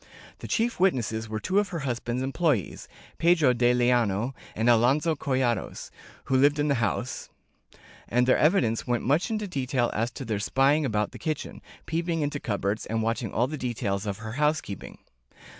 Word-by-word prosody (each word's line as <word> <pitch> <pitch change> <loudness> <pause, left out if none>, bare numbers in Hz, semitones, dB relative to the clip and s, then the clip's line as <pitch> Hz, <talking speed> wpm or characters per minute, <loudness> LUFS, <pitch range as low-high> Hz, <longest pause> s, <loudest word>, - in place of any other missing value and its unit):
The - - -7
chief 230 -2 0
witnesses 115 - +1
were 110 0 -3
two 190 - +1
of 205 - -1
her 170 -4 -4
husband's 120 -1 -2
employees, 135 - -1 0.3
Pedro 160 -6 +4
de 120 0 +3
Liano 120 -1 +1 0.2
and 110 +2 0
Alonso 130 +8 +4
Collados, 130 -6 -2 0.3
who 135 - -1
lived 145 +3 +4
in 150 0 +1
the - - +4
house, 120 +3 -2 0.8
and 125 +1 +2
their 130 - +4
evidence 135 - +2
went 120 -1 0
much 145 - +1
into 215 -2 -2
detail 130 -6 -1
as 115 +3 0
to 135 - -7
their 110 -3 -2
spying 140 +7 +2
about 105 -4 -1
the - - -11
kitchen, 155 -3 -4 0.2
peeping 165 0 -1
into 145 0 -2
cupboards, 100 -2 -2
and 110 0 -1
watching 115 -1 -1
all 115 +4 +1
the 150 +2 -5
details 110 -5 -2
of 100 -1 -3
her 110 0 -7
housekeeping. 150 - -2
125 Hz, 175 wpm, -26 LUFS, 115-150 Hz, 0.8 s, Pedro